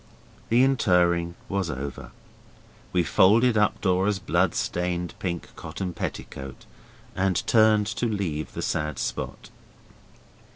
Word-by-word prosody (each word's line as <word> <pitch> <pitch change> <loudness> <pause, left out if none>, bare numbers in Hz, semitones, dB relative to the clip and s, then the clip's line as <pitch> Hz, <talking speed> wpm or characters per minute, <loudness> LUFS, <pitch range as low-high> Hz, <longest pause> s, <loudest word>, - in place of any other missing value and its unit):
The 120 +3 +5
interring 90 -9 +2
was 95 -3 -1
over. 70 -1 -6 0.8
We 90 - +2
folded 110 +8 +4
up 105 -1 +2
Dora's 95 +1 +2
bloodstained 90 -1 -1
pink 85 -2 -4
cotton 90 -2 -5
petticoat, 65 -4 -6 0.5
and 95 -1 0
turned 110 -2 +4 0.2
to 120 - +2
leave 90 -8 -3
the - - -4
sad 75 0 -2
spot. - - -4
90 Hz, 110 wpm, -25 LUFS, 85-105 Hz, 0.8 s, The